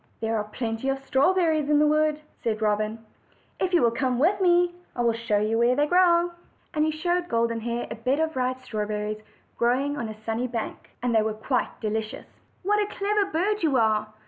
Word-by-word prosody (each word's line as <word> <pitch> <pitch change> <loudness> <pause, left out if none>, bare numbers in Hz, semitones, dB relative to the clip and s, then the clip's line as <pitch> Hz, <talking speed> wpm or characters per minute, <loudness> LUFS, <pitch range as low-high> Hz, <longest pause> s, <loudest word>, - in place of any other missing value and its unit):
"There 225 0 -1
are 210 -1 -1
plenty 225 +3 -3
of 270 - 0
strawberries 310 +3 +2
in 300 - +4
the 300 - +5
wood," 305 0 +2 0.2
said 220 -2 -1
Robin, 215 +1 -1 0.5
"If 370 - 0
you 345 -7 +4
will 235 - +4
come 255 +1 0
with 370 +9 +2
me, 350 -1 +4 0.2
I 245 - -1
will 235 -1 +3
show 230 -2 0
you 215 +2 +1
where 240 +2 +4
they 290 +2 +3
grow." 350 +1 +4 0.4
And 305 - +1
he 310 - +2
showed 350 +3 -1
Golden 230 0 0
Hair 235 +1 -2
a - - -3
bed 255 +6 0
of 320 -1 0
ripe 255 0 0
red 255 - -21
straw 210 -3 -3
berries 210 0 -3 0.4
growing 265 +5 +1
on 235 -5 -3
a 215 0 -9
sunny 225 +3 -1
bank. 230 -2 -5
They 235 -3 +3
were 215 0 -1
quite 245 +4 -2
delicious. 220 0 -3 0.4
"What 415 +3 +2
a 415 - +1
clever 410 0 0
bird 400 +4 0
yon 310 -5 +2
are!" 215 -3 +2
255 Hz, 210 wpm, -25 LUFS, 225-320 Hz, 0.5 s, the